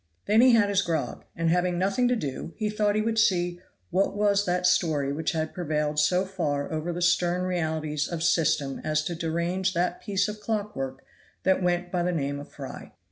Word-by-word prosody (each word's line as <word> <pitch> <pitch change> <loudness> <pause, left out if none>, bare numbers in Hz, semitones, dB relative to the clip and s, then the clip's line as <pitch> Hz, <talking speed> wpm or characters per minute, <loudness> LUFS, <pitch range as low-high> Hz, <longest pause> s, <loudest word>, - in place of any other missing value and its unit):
Then 215 +2 +5
he 255 -1 +6
had 215 -3 +4
his 200 -1 +3
grog, 160 -9 -3
and 165 0 +1
having 180 0 +1
nothing 195 +7 +2
to 250 - +2
do 150 - -5
he 215 -2 -1
thought 210 -1 +1
he 215 - +1
would 225 0 0
see 175 -4 +2 0.3
what 195 +2 +1
was 205 -1 +2
that 180 0 +1
story 155 -6 +2
which 160 +4 -1
had 155 -1 -2
prevailed 150 -3 -1
so 180 +5 +3
far 145 -7 -2
over 155 +2 -2
the 175 +1 -2
stern 180 0 +2
realities 160 -4 -1
of 165 -2 -4
system 155 -5 +1
as 155 0 0
to 170 - -3
derange 170 +3 -1
that 175 +1 0
piece 200 -1 0
of 210 0 -6
clock 210 -1 -3
work 135 0 -5 0.4
that 190 0 +3
went 175 0 0
by 180 - 0
the 180 +1 +1
name 140 -4 -2
of 145 - -10
Fry. - - -9
175 Hz, 205 wpm, -26 LUFS, 155-195 Hz, 0.4 s, he